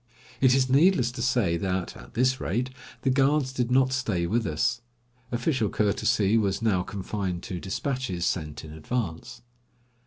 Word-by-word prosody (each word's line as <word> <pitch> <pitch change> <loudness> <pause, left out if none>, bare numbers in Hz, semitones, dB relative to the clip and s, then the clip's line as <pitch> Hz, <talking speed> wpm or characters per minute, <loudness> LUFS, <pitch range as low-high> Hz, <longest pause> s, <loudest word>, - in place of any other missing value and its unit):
It 130 -1 +5
is 130 -1 +3
needless 135 -2 +4
to 125 -1 -6
say 115 -9 +2
that, 95 -1 -2
at - - -13
this 130 +2 +2
rate, 120 +8 -1 0.3
the 135 - +3
guards 135 0 +2
did 125 -2 -1
not 130 0 +3
stay 110 -9 0
with 110 +5 0
us. 80 +9 0 0.5
Official 120 -2 0
courtesy 105 0 +2
was 100 -3 0
now 105 -5 +2
confined 95 -2 -4
to 90 - -5
despatches 95 -2 -2
sent 80 -4 -3
in 75 - -10
advance. 80 +3 -4
115 Hz, 155 wpm, -26 LUFS, 95-130 Hz, 0.5 s, It